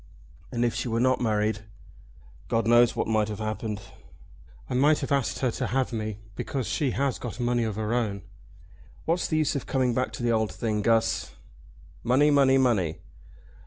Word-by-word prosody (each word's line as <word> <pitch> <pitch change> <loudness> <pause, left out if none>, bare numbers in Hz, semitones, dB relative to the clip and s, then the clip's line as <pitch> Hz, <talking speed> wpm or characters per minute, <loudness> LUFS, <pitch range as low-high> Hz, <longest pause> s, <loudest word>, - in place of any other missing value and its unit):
"And 120 -1 0
if 120 - 0
she 125 +3 -3
were 115 0 0
not 130 +1 +2
married?" 110 -1 +1 0.9
"God 115 -1 0
knows 120 +1 +5
what - - -1
might 110 -1 +2
have 105 -1 -5
happened. 110 -1 -4 0.8
I - - -5
might 145 +4 +4
have - - -4
asked 140 -3 +1
her 125 - +2
to - - -3
have 130 -1 -1
me, 110 -2 -3 0.2
because 130 +2 -3
she 140 +4 0
has 135 +1 -1
got 120 -1 -6
money 120 -1 +1
of 110 -2 -3
her 110 +1 -2
own. 105 -5 -1 0.8
What's 170 +2 +1
the 155 - 0
use 155 -2 +1
of 140 - -4
coming 130 -2 +1
back 130 +2 -1
to - - -6
the 120 - +2
old 110 -2 +1
thing, 110 -2 -2
Guss?" 115 +1 +1 0.7
"Money, 135 +5 +4
money, 135 -2 +5
money!" 110 -12 +2
120 Hz, 185 wpm, -26 LUFS, 110-130 Hz, 0.9 s, knows